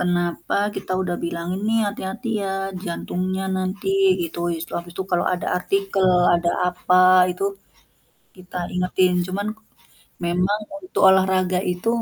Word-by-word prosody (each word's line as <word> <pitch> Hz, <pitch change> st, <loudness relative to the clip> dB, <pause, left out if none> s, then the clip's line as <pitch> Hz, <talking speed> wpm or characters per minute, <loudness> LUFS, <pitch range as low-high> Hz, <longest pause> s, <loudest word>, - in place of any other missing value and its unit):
kenapa 175 Hz, -1 st, -1 dB, 0.2 s
kita -, -, -4 dB
udah 175 Hz, -1 st, -2 dB
bilang 170 Hz, 0 st, -4 dB
ini 215 Hz, +2 st, 0 dB
hati-hati 205 Hz, +4 st, -5 dB, 0.2 s
ya, 195 Hz, -, -2 dB, 0.3 s
jantungnya 185 Hz, +2 st, -3 dB
nanti 185 Hz, +2 st, -3 dB, 0.4 s
gitu, 165 Hz, +1 st, -7 dB, 0.4 s
habis 170 Hz, 0 st, -6 dB
itu 190 Hz, -, -2 dB
kalau 175 Hz, -, +2 dB
ada 180 Hz, -, -5 dB
artikel, 195 Hz, +1 st, 0 dB, 0.3 s
ada 170 Hz, 0 st, +1 dB, 0.2 s
apa 180 Hz, +1 st, +3 dB, 0.3 s
itu, 180 Hz, +2 st, -4 dB, 0.9 s
kita 185 Hz, 0 st, -11 dB, 0.2 s
ingetin. 180 Hz, 0 st, +2 dB
Cuman 195 Hz, +2 st, -3 dB, 0.8 s
memang 180 Hz, +4 st, +1 dB, 0.2 s
untuk 370 Hz, -, -3 dB
olahraga 185 Hz, -1 st, +2 dB
itu 180 Hz, +5 st, -4 dB
185 Hz, 125 wpm, -22 LUFS, 175-190 Hz, 0.9 s, apa